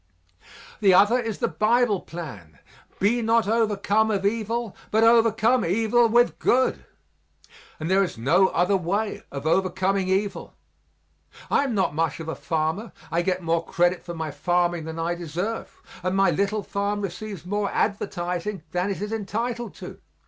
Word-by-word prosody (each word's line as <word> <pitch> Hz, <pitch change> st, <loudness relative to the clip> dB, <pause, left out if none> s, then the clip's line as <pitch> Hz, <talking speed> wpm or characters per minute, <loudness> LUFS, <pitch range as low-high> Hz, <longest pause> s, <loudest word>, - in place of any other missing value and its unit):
The 195 Hz, -4 st, +5 dB
other 205 Hz, +6 st, +5 dB
is 225 Hz, -4 st, -3 dB
the -, -, 0 dB
Bible 220 Hz, -1 st, +2 dB
plan 110 Hz, -, -9 dB, 0.4 s
"Be 230 Hz, +5 st, +2 dB
not 225 Hz, -1 st, +2 dB
overcome 220 Hz, -1 st, +2 dB
of 200 Hz, -2 st, -1 dB
evil 225 Hz, +1 st, -1 dB
but 220 Hz, +1 st, +3 dB
overcome 230 Hz, +1 st, +4 dB
evil 225 Hz, +6 st, +2 dB
with 240 Hz, +2 st, +3 dB
good." 255 Hz, +1 st, +2 dB, 0.9 s
And 155 Hz, -, -3 dB
there 190 Hz, +2 st, +3 dB
is 180 Hz, -, -4 dB
no 170 Hz, +11 st, +4 dB
other 180 Hz, +3 st, +1 dB
way 195 Hz, +4 st, -1 dB
of 140 Hz, +1 st, -6 dB
overcoming 190 Hz, +2 st, +1 dB
evil. 195 Hz, +1 st, -2 dB, 1.0 s
I 285 Hz, -, +3 dB
am 250 Hz, -5 st, -2 dB
not 190 Hz, -6 st, +1 dB
much 160 Hz, -1 st, -1 dB
of 165 Hz, -, -7 dB
a 160 Hz, -, -2 dB
farmer 160 Hz, +7 st, -2 dB, 0.2 s
I 170 Hz, +2 st, +1 dB
get 180 Hz, 0 st, -1 dB
more 165 Hz, 0 st, +1 dB
credit 175 Hz, +2 st, +1 dB
for 170 Hz, -, -7 dB
my 160 Hz, -2 st, -4 dB
farming 175 Hz, +2 st, 0 dB
than 160 Hz, 0 st, -6 dB
I 165 Hz, +1 st, -1 dB
deserve, 175 Hz, +6 st, -5 dB, 0.2 s
and 185 Hz, +1 st, -1 dB
my 195 Hz, -2 st, +4 dB
little 200 Hz, +5 st, 0 dB
farm 205 Hz, +1 st, -2 dB
receives 195 Hz, -1 st, -6 dB
more 205 Hz, +1 st, -1 dB
advertising 185 Hz, -2 st, -2 dB
than 180 Hz, +2 st, -1 dB
it 200 Hz, 0 st, -3 dB
is 210 Hz, -, -4 dB
entitled 230 Hz, +3 st, -3 dB
to. -, -, -10 dB
195 Hz, 160 wpm, -24 LUFS, 175-220 Hz, 1.0 s, The